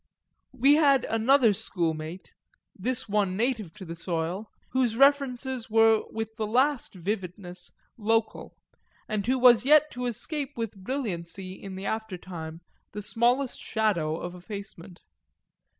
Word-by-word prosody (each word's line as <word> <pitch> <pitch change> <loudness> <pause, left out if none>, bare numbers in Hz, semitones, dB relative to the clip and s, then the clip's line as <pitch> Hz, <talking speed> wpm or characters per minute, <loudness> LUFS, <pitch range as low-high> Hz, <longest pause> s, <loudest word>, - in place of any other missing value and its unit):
We 275 +4 +5
had 280 -5 +4
another 230 +1 +4
schoolmate, 165 -1 -3 0.4
this 240 +6 -3
one 200 -3 0
native 225 -6 -1
to 200 -3 -9
the 165 0 -6
soil, 170 +4 -3 0.2
whose 250 -3 +1
references 265 -2 +2
were 225 0 +5
with 220 0 -5
the 215 -2 -2
last 255 +1 +1
vividness 180 -1 -5 0.3
local 225 0 -1 0.5
and 215 0 -2
who 260 +1 +2
was 245 -2 +6
yet 305 +2 +5
to 250 0 -3
escape 285 +4 -4
with 225 -3 -3
brilliancy 190 -5 -4
in 190 0 -9
the 190 +1 -6
aftertime 180 -6 -5 0.3
the 210 0 -5
smallest 245 +5 +1
shadow 175 -8 0
of 175 - -6
effacement. 185 -1 -9
220 Hz, 130 wpm, -27 LUFS, 185-250 Hz, 0.5 s, was